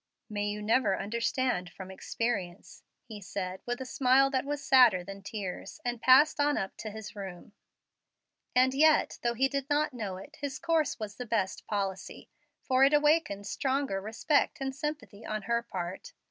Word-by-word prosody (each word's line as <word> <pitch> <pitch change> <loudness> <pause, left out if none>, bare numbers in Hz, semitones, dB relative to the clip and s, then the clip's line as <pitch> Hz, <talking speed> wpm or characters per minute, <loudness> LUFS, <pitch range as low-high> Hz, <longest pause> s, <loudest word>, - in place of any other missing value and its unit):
"May 205 0 -1
you 210 0 -4
never 220 -2 +2
understand 230 -1 -1
from 190 +2 -10
experience," 195 -2 -4 0.2
he 215 -2 -10
said 185 -1 -5
with 245 +1 -2
a 260 - -5
smile 265 +1 +3
that 260 0 0
was 285 -1 -4
sadder 250 -9 +6
than 195 +2 -9
tears, 195 +5 -6
and 240 -1 -2
passed 280 +4 +6
on 290 0 +2
up 190 - -3
to 220 - -6
his 215 +1 -9
room. 195 -1 -8 1.0
And 260 +1 +4
yet, 310 +2 +3
though 235 0 0
he 265 +3 +3
did 275 +1 -3
not 295 0 +1
know 205 -6 -4
it, 285 +11 -12
his 280 -2 -3
course 330 -5 0
was 210 -3 -6
the 250 - -6
best 210 -4 -1
policy, 195 -2 -4 0.3
for 260 0 +3
it 280 +2 +6
awakened 295 -9 +2
stronger 265 -7 -1
respect 225 +9 +1
and 270 -1 -3
sympathy 290 -7 -5
on 215 -1 -4
her 235 +2 0
part. 190 - -6
235 Hz, 175 wpm, -30 LUFS, 200-270 Hz, 1.0 s, sadder